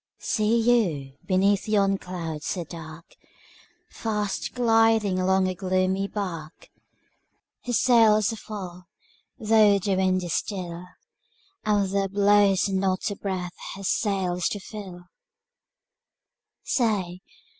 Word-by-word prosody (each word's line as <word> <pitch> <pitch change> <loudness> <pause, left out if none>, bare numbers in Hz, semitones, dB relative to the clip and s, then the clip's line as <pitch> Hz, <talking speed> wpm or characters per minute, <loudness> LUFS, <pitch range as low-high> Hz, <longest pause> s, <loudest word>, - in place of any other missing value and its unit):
See 215 +1 +1
you, 180 - +1
beneath 195 +2 +2
yon 195 -2 +2
cloud 165 -4 -6
so 175 +3 -3
dark, 160 0 -11 0.8
Fast 210 -2 -3
gliding 225 -5 +3
along 190 0 +2
a 185 - -1
gloomy 185 +1 0
bark? 170 -7 -6 1.0
Her 245 - -2
sails 225 -3 +4
are - - -7
full, 185 -5 -8 0.5
though 215 -2 +4
the 195 0 -1
wind 185 -1 +1
is 175 -3 -3
still, 180 -3 -4 0.8
And 205 -2 +2
there 195 0 0
blows 205 -1 +3
not 190 +1 -1
a - - -4
breath 185 -3 -4 0.2
her 195 - -9
sails 185 -3 0
to 205 - -4
fill! 190 -3 -9
195 Hz, 110 wpm, -25 LUFS, 185-210 Hz, 1.0 s, sails